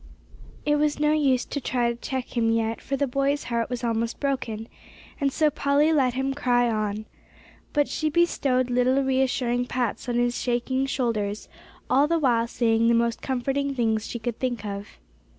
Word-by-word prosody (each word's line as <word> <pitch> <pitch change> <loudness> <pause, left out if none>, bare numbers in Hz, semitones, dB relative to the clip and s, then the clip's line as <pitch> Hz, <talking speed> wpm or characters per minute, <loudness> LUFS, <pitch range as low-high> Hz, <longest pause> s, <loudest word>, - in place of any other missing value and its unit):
It 295 0 +3
was 300 0 +1
no 300 0 +3
use 275 -5 +2
to 285 - -4
try 240 -2 0
to - - -5
check 255 +2 -5
him 230 -1 +2
yet, 225 0 0
for 275 - -2
the 285 - +1
boy's 275 +2 0
heart 235 -1 -2
was 245 -1 -4
almost 230 0 -1
broken, 240 -6 -2 0.5
and 280 -1 +1
so 305 +1 +2
Polly 285 +3 +2
let 260 -5 +2
him 270 +1 -1
cry 245 -3 +2
on. 215 -1 -2 0.7
But 290 -1 +2
she 310 - -1
bestowed 275 -6 +1
little 255 +2 +3
reassuring 255 -2 +1
pats 245 0 -2
on 240 - -1
his 240 0 +1
shaking 260 +2 0
shoulders, 215 -6 -2 0.4
all 280 +3 +4
the 335 +1 +2
while 240 -6 +2
saying 230 -1 +2
the 235 - +4
most 235 0 +1
comforting 270 +2 -1
things 220 -3 0
she - - -4
could 235 0 -4
think 245 -5 -2
of. 200 0 -5
250 Hz, 180 wpm, -25 LUFS, 235-275 Hz, 0.7 s, all